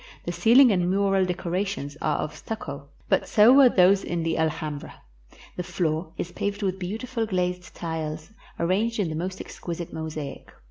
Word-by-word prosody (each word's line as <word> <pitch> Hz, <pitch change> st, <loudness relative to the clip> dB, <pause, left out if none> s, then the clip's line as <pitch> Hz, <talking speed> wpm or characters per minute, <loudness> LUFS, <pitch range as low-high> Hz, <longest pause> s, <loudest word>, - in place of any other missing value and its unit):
The -, -, -2 dB
ceiling 245 Hz, +2 st, +6 dB
and 180 Hz, -2 st, +1 dB
mural 195 Hz, 0 st, +2 dB
decorations 180 Hz, -4 st, -3 dB
are 150 Hz, -1 st, +1 dB
of 155 Hz, -, -4 dB
stucco, 140 Hz, -9 st, -6 dB, 0.2 s
but -, -, +1 dB
so 220 Hz, +4 st, +6 dB
were 270 Hz, -2 st, +8 dB
those 190 Hz, -1 st, +4 dB
in 170 Hz, -1 st, -2 dB
the 165 Hz, 0 st, 0 dB
Al 160 Hz, 0 st, +2 dB
hambra. 150 Hz, -1 st, -6 dB, 0.6 s
The -, -, -1 dB
floor 165 Hz, -2 st, -2 dB
is 175 Hz, -, -4 dB
paved 205 Hz, +2 st, -3 dB
with 190 Hz, -1 st, -1 dB
beautiful 225 Hz, +5 st, -3 dB
glazed 180 Hz, -3 st, -2 dB
tiles, 160 Hz, 0 st, -5 dB, 0.3 s
arranged 205 Hz, +7 st, +1 dB
in 190 Hz, -5 st, +1 dB
the 155 Hz, -, -4 dB
most 185 Hz, +4 st, -4 dB
exquisite 170 Hz, 0 st, -6 dB
mosaic. 155 Hz, -3 st, -6 dB
180 Hz, 170 wpm, -25 LUFS, 160-200 Hz, 0.6 s, were